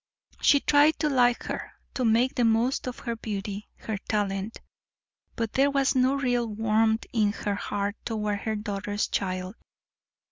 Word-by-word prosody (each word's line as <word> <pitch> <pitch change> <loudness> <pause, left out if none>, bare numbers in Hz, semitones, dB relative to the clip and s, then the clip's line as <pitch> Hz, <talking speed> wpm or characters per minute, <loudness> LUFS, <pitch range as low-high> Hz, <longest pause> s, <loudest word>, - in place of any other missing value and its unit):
She 285 - +5
tried 290 +2 +4
to 305 - +1
like 245 -2 +3
her, - - -5 0.2
to 255 - -2
make 235 +3 +3
the 245 - +1
most 230 +4 +2
of 250 - -4
her 235 -1 -4
beauty, 205 -2 -5
her 215 -3 -5
talent, 200 0 -2 0.8
but 230 -2 -3
there 275 +2 +4
was 275 -1 +2
no 260 +1 +3
real 245 -3 0
warmth 220 +1 +1
in 210 -3 +2
her 205 -1 -2
heart 205 +1 -3
toward 210 -2 -2
her 220 +1 -2
daughter's 205 -1 -2
child. 185 -1 -2
225 Hz, 155 wpm, -27 LUFS, 205-250 Hz, 0.8 s, She